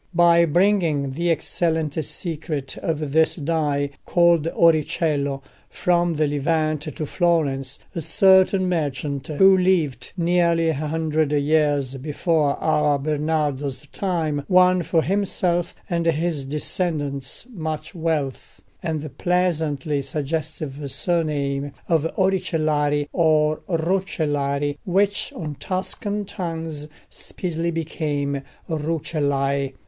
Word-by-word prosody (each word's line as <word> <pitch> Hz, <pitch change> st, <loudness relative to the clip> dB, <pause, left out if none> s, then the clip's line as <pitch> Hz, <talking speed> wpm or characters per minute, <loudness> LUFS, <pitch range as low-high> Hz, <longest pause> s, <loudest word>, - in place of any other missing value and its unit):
By 170 Hz, -1 st, +6 dB
bringing 170 Hz, -5 st, +2 dB
the 170 Hz, +6 st, -1 dB
excellent 160 Hz, -1 st, 0 dB
secret 150 Hz, -4 st, -4 dB
of 155 Hz, -3 st, -2 dB
this 160 Hz, +2 st, +3 dB
dye, 145 Hz, -3 st, -1 dB
called 170 Hz, -2 st, +3 dB
oricello, 150 Hz, -4 st, +1 dB, 0.3 s
from 175 Hz, -1 st, +1 dB
the 155 Hz, 0 st, +2 dB
Levant 155 Hz, +1 st, 0 dB
to 155 Hz, 0 st, -5 dB
Florence, 145 Hz, -6 st, 0 dB, 0.2 s
a 165 Hz, -, -3 dB
certain 190 Hz, +2 st, +4 dB
merchant, 145 Hz, -5 st, -2 dB
who 190 Hz, +5 st, +5 dB
lived 170 Hz, -10 st, +1 dB
nearly 170 Hz, -1 st, +2 dB
a -, -, +2 dB
hundred 155 Hz, 0 st, -1 dB
years 145 Hz, -2 st, +1 dB
before 150 Hz, +1 st, 0 dB
our 150 Hz, -2 st, +2 dB
Bernardo's 150 Hz, -1 st, -1 dB
time, 160 Hz, -7 st, -1 dB
won 185 Hz, -1 st, +5 dB
for 165 Hz, -1 st, +1 dB
himself 180 Hz, -3 st, 0 dB
and 170 Hz, -1 st, -1 dB
his 160 Hz, -3 st, 0 dB
descendants 145 Hz, -, -2 dB
much 160 Hz, -5 st, -4 dB
wealth, 160 Hz, -6 st, -3 dB, 0.2 s
and 160 Hz, -2 st, -2 dB
the 155 Hz, -, -6 dB
pleasantly 155 Hz, -3 st, 0 dB
suggestive 150 Hz, 0 st, -4 dB
surname 145 Hz, -5 st, -1 dB
of 165 Hz, -2 st, +2 dB
Oricellari, 155 Hz, -6 st, +1 dB
or 155 Hz, -2 st, +3 dB
Roccellari, 150 Hz, -5 st, -1 dB
which 200 Hz, +2 st, +1 dB
on 150 Hz, -4 st, -5 dB
Tuscan 200 Hz, +2 st, -2 dB
tongues 165 Hz, -5 st, -5 dB, 0.2 s
speedily 170 Hz, -2 st, -4 dB
became 150 Hz, -4 st, -2 dB, 0.3 s
Rucellai. 140 Hz, -3 st, -1 dB
155 Hz, 105 wpm, -23 LUFS, 145-170 Hz, 0.3 s, By